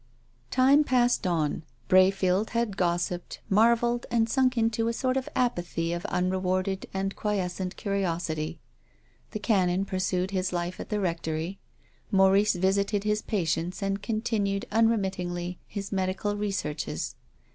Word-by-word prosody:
Time 270 +3 +5
passed 245 -6 +2
on. 160 -4 0 0.3
Brayfield 190 +1 +4
had 235 -4 0
gossiped, 175 0 -1
mar 225 +4 +6
velled 240 +1 -1
and 230 -1 +2
sunk 255 +1 +2
into 225 0 +1
a 230 - 0
sort 255 +2 0
of 265 -1 -2
apathy 175 -8 0
of 175 - -3
unrc 185 +1 0
warded 185 +1 -1
and 195 0 -2
quiescent 190 -3 -2
curiosity. 170 -5 -2 0.7
The - - -4
Canon 195 -3 +1
pur 190 -1 -3
sued 185 0 0
his 185 -1 -1
life 175 0 -3
at - - -7
the 210 - 0
Rectory. 165 0 -2 0.5
Maurice 195 +1 +4
visited 200 +3 +1
his 210 0 +1
patients 175 -1 -1
and 195 0 -1
continued 215 -3 -1
unremittingly 190 -5 0
his 200 -2 -6
medical 195 +1 -1
researches. 195 -7 -3
195 Hz, 135 wpm, -27 LUFS, 180-215 Hz, 0.7 s, mar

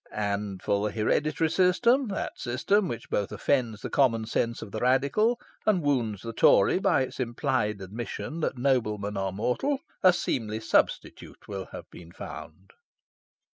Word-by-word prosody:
And 100 -2 -3
for 100 0 +1
the - - -11
hereditary 155 +8 +1
system 235 +10 +3
that 200 - -3
system 180 +12 +1
which 120 -8 -6
both 100 -1 -1
offends 115 0 0
the - - -3
common 115 -5 +2
sense 115 +1 -1
of 100 - -10
the 110 - -4
Radical, 140 - +2 0.2
and 195 -6 +2
wounds 120 -9 0
the 115 0 -5
Tory 105 - +5
by 135 - +3
its 130 - -7
implied 120 -4 -1
admission 115 - -6
that 150 - -1
noblemen 105 -6 0
are 95 -1 -1
mortal 125 - -1 0.2
a 185 - +7
seemly 110 - -2
substitute 110 - -1
will 95 -2 -5
have - - -9
been 85 -1 -12
found." 95 +2 -10
120 Hz, 155 wpm, -27 LUFS, 105-150 Hz, 0.2 s, a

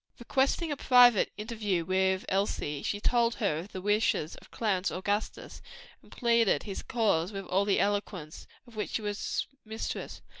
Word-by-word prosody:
Requesting 270 +6 0
a 290 - -2
private 245 -5 +6
interview 210 -5 -2
with 190 +1 +1
Elsie, 185 -7 -1
she 205 - -2
told 235 +1 +2
her 160 -8 0
of 185 +5 -9
the 185 - -7
wishes 205 -6 +1
of - - -16
Clarence 200 -4 0
Augustus, 205 +3 -3 0.4
and - - -21
plead 235 -2 +2 0.2
his 195 -3 -5
cause 205 -6 0
with 195 -2 -6
all 195 +2 +1
the 200 - +2
eloquence 200 -6 -2 0.2
of 240 -2 -17
which 210 - -4
she 220 - -2
was 205 0 -2 0.2
mistress. 220 +1 -5
205 Hz, 160 wpm, -29 LUFS, 190-230 Hz, 0.4 s, private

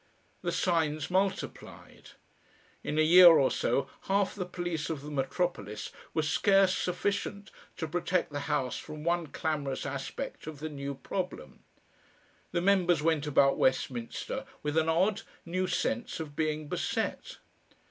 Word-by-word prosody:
The - - -1
signs 160 -2 0
multiplied. 190 +1 -3 0.7
In 150 - -2
a 155 - +5
year 175 +3 +9
or 150 -6 +7
so 135 0 0 0.2
half 195 0 +1
the 185 -3 -4
police 175 -3 -3
of 150 -4 -4
the 150 - -7
metropolis 135 - -2 0.2
were 160 - +2
scarce 195 +4 +4
sufficient 200 +2 -2 0.3
to 160 - -3
protect 175 +1 0
the 145 - -3
House 135 -4 0
from 155 -1 -8
one 170 0 0
clamorous 145 -4 -2
aspect 140 - -5
of 155 -2 -6
the 155 +1 -4
new 140 -1 -5
problem. 180 +7 -5 0.9
The 175 - 0
members 180 -4 +3
went 160 -2 +1
about 135 -1 +4
Westminster 130 - -1 0.2
with 150 0 -2
an 160 0 +3
odd, 195 +6 +2 0.2
new 185 +2 -1
sense 240 +6 -1
of 150 -3 -6
being 155 -1 -1
beset. - - -2
160 Hz, 140 wpm, -30 LUFS, 145-180 Hz, 0.9 s, year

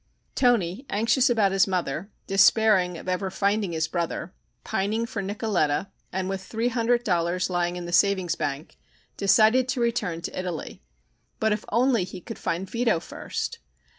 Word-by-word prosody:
Toni, 230 -4 +2
anxious 230 +5 +2
about 215 -5 +3
his 195 +1 +3
mother, 180 -1 -2 0.2
despairing 195 -2 +4
of - - -11
ever 185 +1 -1
finding 200 0 0
his 160 0 0
brother, 170 +1 -3 0.3
pining 215 +4 -1
for 220 -3 -4
Nicoletta 195 -5 -1 0.2
and 185 0 -2
with 195 0 -3
three 225 +4 -1
hundred 240 0 +1
dollars 180 -2 0
lying 175 0 0
in 175 -1 -5
the 175 - -6
savings 190 -1 +3
bank, 145 -1 -4 0.4
decided 220 +6 +4
to 260 0 -1
return 220 -8 -1
to - - -6
Italy. 180 -4 -5 0.6
But 220 0 +2
if 210 0 -1
only 235 -2 +2
he 185 +1 -7
could - - -9
find 180 +3 -2
Vito 230 -4 +1
first! - - -5
195 Hz, 160 wpm, -25 LUFS, 175-225 Hz, 0.6 s, despairing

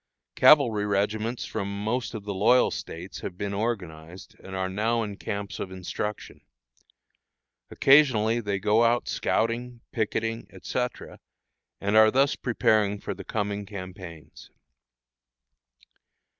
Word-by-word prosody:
Cavalry 115 -9 +5
regiments 105 +4 -1
from 100 +1 -4
most 115 +1 -2
of 105 - -6
the 100 0 -4
loyal 115 +6 +4
States 85 +4 -7
have 90 - -7
been 100 0 -3
organized, 90 -6 -5
and 95 - -9
are 95 0 -1
now 110 +5 0
in 105 -2 -5
camps 100 -2 -5
of 95 - -4
instruction. 95 +3 -5 1.3
Occasionally 125 -6 +4
they 100 -3 -2
go 105 +4 +3
out 120 +1 +2
scouting, 120 +1 -1
picketing, 115 +1 -2
etc., 125 -1 -5 0.6
and 100 +2 -1
are 110 0 +7
thus 135 +4 +2
preparing 105 -4 +1
for - - -4
the 95 0 -9
coming 105 0 -3
campaigns. 95 -5 -10
105 Hz, 120 wpm, -26 LUFS, 100-115 Hz, 1.3 s, are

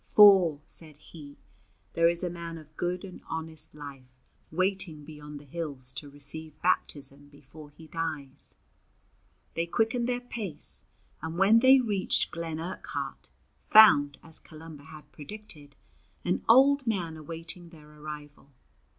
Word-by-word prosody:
"For," 190 -8 +7
said 155 -3 -4
he, 150 -2 -13 0.6
"there 165 0 +4
is 170 +1 -1
a 180 - 0
man 170 -1 -7
of 155 -1 -15
good 180 +2 -2
and 185 - -11
honest 160 -2 -5
life 135 -3 -11 0.3
waiting 185 -3 +2
beyond 150 -1 -10
the - - -15
hills 140 -4 -1
to 145 +3 -6
receive 145 +2 -2
baptism 145 -5 0
before 145 +1 -14
he 160 +2 -15
dies." 155 -4 -4 1.0
They 165 +1 -1
quickened 235 +6 0
their 245 0 0
pace, 215 -10 -5 0.4
and 160 +1 -5
when 200 +5 +6
they 260 +2 +7
reached 205 -6 +1
Glen 165 -2 -4
Urquhart, 175 +3 -5 0.3
found, 145 -10 +6
as 160 -1 -5
Columba 155 -2 -12
had 155 -2 -13
predicted, 150 -3 -8 0.5
an 95 0 0
old 270 +1 +6
man 175 -7 -1
awaiting 165 +2 -4
their 155 -3 -16
arrival. 150 -1 -10
160 Hz, 135 wpm, -28 LUFS, 150-180 Hz, 1.0 s, For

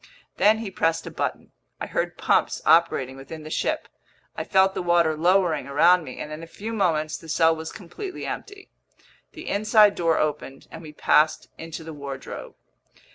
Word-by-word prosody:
Then 215 +2 +5
he 220 -3 -6
pressed 165 -3 0
a - - -7
button. - - -4 0.3
I - - -3
heard - - -3
pumps - - +1
operating 135 -6 +3
within 150 +4 -9
the 155 - -9
ship, - - -1 0.5
I - - -3
felt 190 0 +3
the 185 - -3
water 170 -2 +2
lowering 175 -2 +2
around 170 +5 +4
me, 130 - -9
and 150 - -6
in 155 +1 -7
a 165 - -9
few 220 +6 -7
moments 155 -7 0
the 165 - -13
cell 160 +1 +3
was 160 0 -7
completely 370 - -8
empty. 405 -2 -7 0.6
The - - -10
inside 210 0 +4
door 165 -3 +1
opened, 145 -3 -3
and 160 - -9
we 155 -2 -10
passed 155 +1 +2
into 165 0 -7
the 160 0 -8
wardrobe. 140 -2 -8
165 Hz, 180 wpm, -24 LUFS, 155-190 Hz, 0.6 s, Then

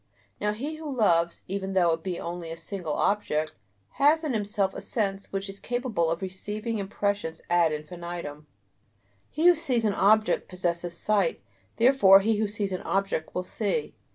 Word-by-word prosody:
Now 210 0 0
he 290 +8 -5
who 310 -2 -6
loves, 170 -9 +2
even 195 0 -3
though 175 -3 +4
it 165 0 -1
be 180 0 -4
only 170 -1 -5
a 165 - -6
single 175 -4 -4
object, 155 -7 0 0.5
has 305 +3 +5
in 300 -5 -1
himself 205 -3 0
a - - -6
sense 200 -3 -2
which 195 0 -3
is 195 0 -9
capable 245 -9 -1
of 165 +3 -2
receiving 210 +4 -4
impressions 200 -4 -2
ad 170 -2 +4
infinitum; 155 -1 -6 0.8
he 315 +3 -1
who 355 - +9
sees 265 -9 0
an 210 - +2
object 215 +3 +3
possesses 175 -1 -2
sight, 205 -4 +1 0.4
therefore 225 -6 +7
he 220 +1 +1
who 215 0 +1
sees 205 -1 -3
an 185 - -3
object 195 -5 -1
will 180 - -1
see. 220 - -2
195 Hz, 170 wpm, -27 LUFS, 175-220 Hz, 0.8 s, who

